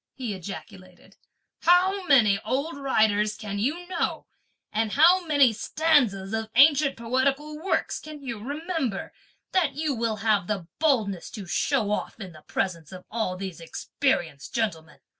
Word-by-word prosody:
he 245 -5 -4
ejaculated; 185 0 -10 0.5
"how 370 +3 +4
many 215 -8 +5
old 280 +8 -2
writers 215 -6 +1
can 205 -2 -5
you 310 +11 -2
know, 355 -2 -2 0.5
and 215 0 0
how 350 +5 +6
many 280 -6 +5
stanzas 225 -7 +1
of 220 0 -2
ancient 280 +1 +5
poetical 270 +6 -1
works 385 - 0
can 310 -1 -10
you 235 -5 -5
remember, 285 - -3 0.4
that 330 -8 +1
you 305 -1 -1
will 230 -2 -1
have 205 -4 +2
the 200 -5 -2
boldness 220 - +1
to 205 -5 -8
show 215 +3 0
off 210 - -3
in 195 -4 -7
the 155 -2 -14
presence 165 -4 -3
of 185 -1 -10
all 215 -5 -2
these 185 -3 -6
experienced 165 - -2
gentlemen? 170 -9 -2
230 Hz, 145 wpm, -26 LUFS, 200-295 Hz, 0.5 s, how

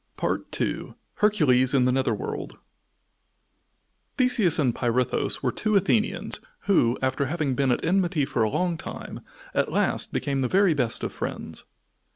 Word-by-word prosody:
II - - -2 0.2
HERCULES 140 -11 +3
IN 130 -2 +4
THE 125 - +3
NETHER 130 +1 +1
WORLD 435 0 -6 1.6
Theseus 245 - +3
and 130 -6 +2
Pirithous 120 +1 0
were - - +1
two 215 -1 -1
Athenians, 205 +3 +1 0.2
who, 125 -11 +2
after 130 +2 0
having 150 -3 -1
been 135 0 +1
at 125 - 0
enmity 175 -4 +1
for 120 - -2
a 110 - +3
long 175 - -1
time - - -7 0.3
at - - 0
last - - 0
became 140 -1 -1
the 130 - +1
very 190 +3 +3
best 125 -6 -1
of - - -3
friends. - - -4
145 Hz, 150 wpm, -25 LUFS, 130-195 Hz, 1.6 s, IN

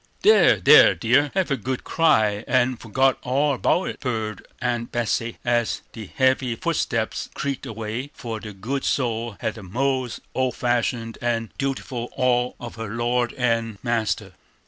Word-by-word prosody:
"There, 435 +1 +6
there, - - +7
dear, 145 0 +3
hev 190 -5 0
a - - +3
good 130 +2 -4
cry, 110 -10 +2
and 130 -1 +1
forgit 130 +4 +2
all 140 +3 +1
about 175 +7 +1
it!" - - -7
purred 110 -5 -3
Aunt 120 -1 -2
Betsey, 115 0 -1
as 120 -1 0
the 110 -3 -8
heavy 130 -2 +2
footsteps - - -1
creaked 140 -1 -3
away, 115 +4 -5
for 115 -2 -5
the 105 0 -8
good 115 +8 -4
soul 115 -4 -1
had - - -3
a - - -9
most 130 +5 -2
old 130 -2 0
fashioned 120 -1 -1
and 115 -2 -1
dutiful 130 -3 -3
awe 125 -1 +2
of 120 -1 -8
her 115 -2 -5
lord 120 +1 0
and 115 -4 0
master. 110 -4 -1
120 Hz, 155 wpm, -23 LUFS, 115-130 Hz, -, there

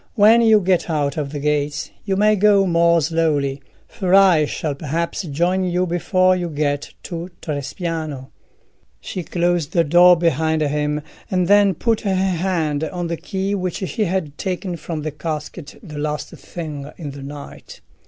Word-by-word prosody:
When 225 +2 +6
you 220 -2 +5
get 180 -1 +1
out 145 -3 0
of 145 -3 -3
the 150 - -4
gates 145 0 -1
you 195 -2 0
may 210 +2 +4
go 200 -1 +4
more 170 -1 +3
slowly, 145 -3 0 0.3
for 190 -4 0
I 185 -6 +6
shall 150 0 -3
perhaps 160 +6 -3
join 175 +3 0
you 180 0 0
before 185 +1 +2
you 175 -1 -3
get 145 -2 -2
to 170 0 -6
Trespiano." 155 -2 -4 0.7
She 185 - -5
closed 175 -2 -1
the 170 - +4
door 175 +3 +6
behind 160 -1 +1
him, 150 0 -1 0.3
and 180 -2 +1
then 200 -1 +5
put 225 +5 0
her 195 -2 0
hand 175 -5 0
on 175 +1 -4
the 170 - -1
key 195 +4 -3
which 185 -3 -2
she 215 +2 -1
had 170 -5 -3
taken 185 -1 -3
from 160 -2 -5
the 155 - -3
casket 150 +1 -6
the 150 -6 -8
last 150 0 -3
thing 150 -4 -7
in 150 -5 -6
the 140 0 -9
night. 140 +1 -10
170 Hz, 165 wpm, -20 LUFS, 150-185 Hz, 0.7 s, When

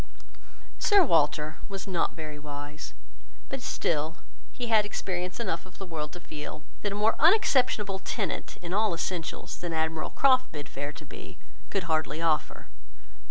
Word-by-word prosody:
Sir 405 -3 +6
Walter 150 - +3
was 195 -1 -4
not 180 -4 0
very 155 -2 -6
wise; 145 - -7 0.5
but - - -3
still 155 +1 0 0.3
he 245 - -4
had 220 -2 +5
experience 185 -2 -3
enough 170 -8 -1
of 180 - -15
the 195 - -6
world 155 -4 -4
to 175 - -7
feel, 155 -2 -7 0.2
that 205 - -1
a - - -2
more 215 +2 +3
unobjectionable 260 - +4
tenant, 200 +1 -3
in 175 +1 -3
all 210 -3 +3
essentials, 165 -1 -3
than 175 -1 -3
Admiral 160 0 0
Croft 255 -2 +4
bid 145 -2 -6
fair 145 +2 -4
to 150 +1 -11
be, - - -10 0.3
could 195 - 0
hardly 155 -2 0
offer. 160 -2 +1
170 Hz, 160 wpm, -29 LUFS, 150-205 Hz, 0.5 s, Sir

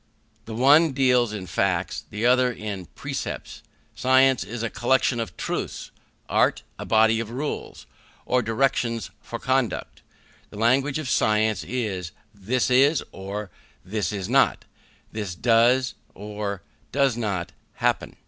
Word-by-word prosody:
The 110 - -6
one 145 +5 +5
deals 125 -4 +3
in 105 -3 -5
facts, - - -1
the 105 +3 -3
other 125 0 +4
in 100 -6 -6
precepts. - - -6 0.3
Science 130 0 +4
is 115 +1 -6
a 115 - -1
collection 125 0 +1
of 115 - -5
truths; - - -4 0.4
art, - - +2 0.2
a - - -5
body 110 0 +4
of 115 -2 -4
rules, 140 +5 -5 0.4
or 125 0 +2
directions 115 -2 0
for - - -6
conduct. 130 -2 -1 0.5
The - - -11
language 135 +6 +2
of 155 -3 -4
science 110 -5 +2
is, 95 -5 -3 0.2
This 115 +6 -1
is, 140 +4 +4
or, 100 +1 -6 0.3
This 105 +2 -2
is 100 -3 -4
not; - - +2 0.5
This 105 -5 -4
does, 120 +5 +3 0.2
or 105 -1 -5 0.3
does 140 -3 +2
not, 100 -7 -2 0.2
happen. - - 0
115 Hz, 135 wpm, -24 LUFS, 105-130 Hz, 0.5 s, one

